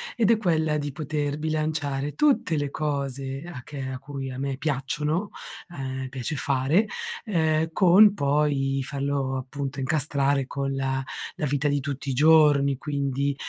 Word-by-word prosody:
ed 225 -5 +2
è 230 - +5
quella 160 -7 +1
di 145 -1 -3
poter 150 -1 -3
bilanciare 150 -2 -1
tutte 280 - +2
le 145 -1 -1
cose 140 -2 -3
a 125 -6 -8
che 145 +1 -8
a 130 - -4
cui 135 0 -6
a 130 - -6
me 135 0 -2
piacciono 150 +6 -1 0.4
ehm, 130 -1 -4
piace 135 +3 -4
fare, 140 +8 +2 0.4
ehm, 160 -5 +1
con 195 +3 +7
poi 140 -4 +1
farlo, 140 -1 -1
appunto, 135 +1 -5
incastrare 140 0 +1
con 135 +1 -3
la 135 0 -1 0.3
la 165 - -1
vita 145 +1 0
di 145 0 +1
tutti 140 -1 -4
i - - -1
giorni, 145 -2 +5
quindi, 140 -1 -1
140 Hz, 150 wpm, -25 LUFS, 135-155 Hz, 0.4 s, con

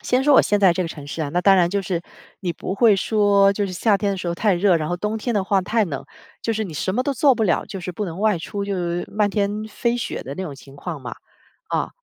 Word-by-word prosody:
先 255 +1 +1
说 290 +1 +4
我 - - +9
现 205 0 +1
在 190 -3 +6
这 185 - -1
个 - - -3
城 145 -3 -9
市 160 +2 -4
啊， 145 - -2
那 175 - +1
当 195 +1 +5
然 175 -2 +4
就 200 0 0
是 175 -3 -2 0.4
你 180 -3 -2
不 185 - -5
会 220 -1 +5
说 200 -1 +3
就 200 0 -1
是 185 - -6
夏 205 +2 +2
天 200 -1 0
的 195 - -4
时 180 - -3
候 170 - -1
太 205 +2 +2
热， 180 0 +3
然 155 -2 -2
后 175 - -1
冬 210 +4 -2
天 235 +1 -2
的 200 - +2
话 190 0 +2
太 220 +3 +1
冷， 140 -7 -5 0.4
就 230 - 0
是 220 0 -1
你 175 - -7
什 185 +6 -2
么 255 - +1
都 280 +2 -1
做 270 +1 +4
不 225 - -1
了， 190 -5 +1
就 195 - -7
是 180 - -5
不 210 +4 -4
能 180 0 -6
外 215 -4 +2
出 200 +4 -4
就 200 -1 -2
是 175 -1 -2
漫 210 -1 +1
天 205 +1 -1
飞 235 +3 -1
雪 235 - -4
的 135 +2 -7
那 190 - -3
种 150 - -6
情 135 0 -15
况 160 0 -6
嘛， 125 - -6 0.5
啊。 - - -1
195 Hz, 320 characters per minute, -22 LUFS, 175-210 Hz, 0.5 s, 我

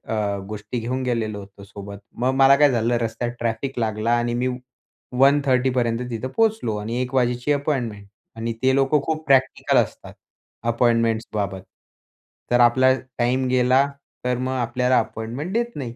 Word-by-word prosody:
अ, 100 -2 -1
गोष्टी 105 +3 -5
घेऊन 125 +3 -3
गेलेलो 115 -4 -2
होतो 100 0 -13
सोबत, 100 0 -9 0.2
मग 125 +2 +1
मला 135 0 +6
काय 145 0 +5
झालं 120 0 +1
रस्त्यात 115 +1 -2
ट्रॅफिक 120 +3 -3
लागला 110 0 -1
आणि 120 0 -1
मी 125 +2 0 0.7
1:30 135 -2 +4
पर्यंत 120 -2 0
तिथं 115 +1 -4
पोहोचलो 220 - +1
आणि 115 +4 -3
1 125 +1 -4
वाजेची 125 +2 +1
अपॉइंटमेंट 125 -8 -2 0.3
आणि 115 +1 -3
ते 130 0 +4
लोकं 135 +2 +2
खूप 160 -1 -2
प्रॅक्टिकल 135 -2 +3
असतात - - -1 0.6
अपॉइंटमेंट्स 115 -1 +1
बाबत. 100 -3 -2 0.9
तर 120 - +4
आपला 130 +2 +5 0.2
टाईम 125 +2 +1
गेला 130 +2 +3 0.4
तर 125 -1 +1
मग 130 +1 -2
आपल्याला 125 +1 +1
अपॉइंटमेंट 115 - -5
देत 235 +1 -1
नाही. 120 -5 -6
120 Hz, 155 wpm, -22 LUFS, 115-130 Hz, 0.9 s, मला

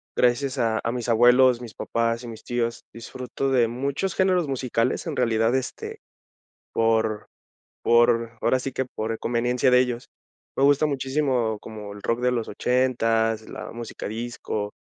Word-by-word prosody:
gracias 125 +3 +2
a 115 -3 +1
a 115 - 0
mis 120 -1 -4
abuelos, 120 +2 +5
mis 115 -2 -9
papás 115 +1 -1
y - - -7
mis 115 -2 -9
tíos, 120 -1 -2
disfruto 125 +3 -4
de 125 -3 +4
muchos 140 +10 -2
géneros 185 -4 +2
musicales, 125 -2 -1
en - - -3
realidad, 115 -1 +2
este, 130 -1 -3 0.8
por 110 -1 +1 0.5
por 115 -1 +3
ahora 130 - +3
sí 135 - -4
que 130 +1 -2
por 110 -2 -4
conveniencia 120 +2 +1
de 125 - +6
ellos. 125 -1 -2 0.5
Me - - -1
gusta 145 +1 +5
muchísimo 135 -5 0
como 105 -2 -8
el 105 - -11
rock 115 +1 0
de 125 0 +2
los 115 -2 -2
ochentas, 115 -3 +1
la - - -7
música 115 -1 -7
disco, 110 -2 -4
120 Hz, 155 wpm, -24 LUFS, 115-130 Hz, 0.8 s, de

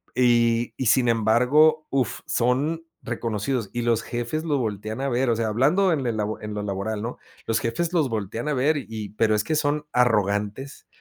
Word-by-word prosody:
y 120 -1 +3
y 130 - -1
sin 120 +2 +4
embargo, 125 +8 +3
uf, 130 -5 -1
son 140 +7 0 0.2
reconocidos 115 -1 -2
y 120 -1 -2
los 115 -1 +2
jefes 120 +6 -3
lo 150 -4 0
voltean 110 0 -3
a 140 - 0
ver, 125 +1 +1
o 115 - +2
sea, 115 -1 -1
hablando 155 - +3
en 135 -4 -2
el 110 -2 -1 0.2
en 105 0 -5
lo 105 - -3
laboral, 105 +2 -3
¿no?, 120 +3 -5 0.3
los 115 -1 +1
jefes 165 +9 -2
los 155 -7 +2
voltean 110 +4 -4
a - - +1
ver 145 +4 +2
y 110 -6 -6
pero, 110 -1 +3
es 105 - +1
que 155 - -1
son 150 0 0
arrogantes, 105 +1 0
120 Hz, 190 wpm, -24 LUFS, 110-140 Hz, 0.3 s, sin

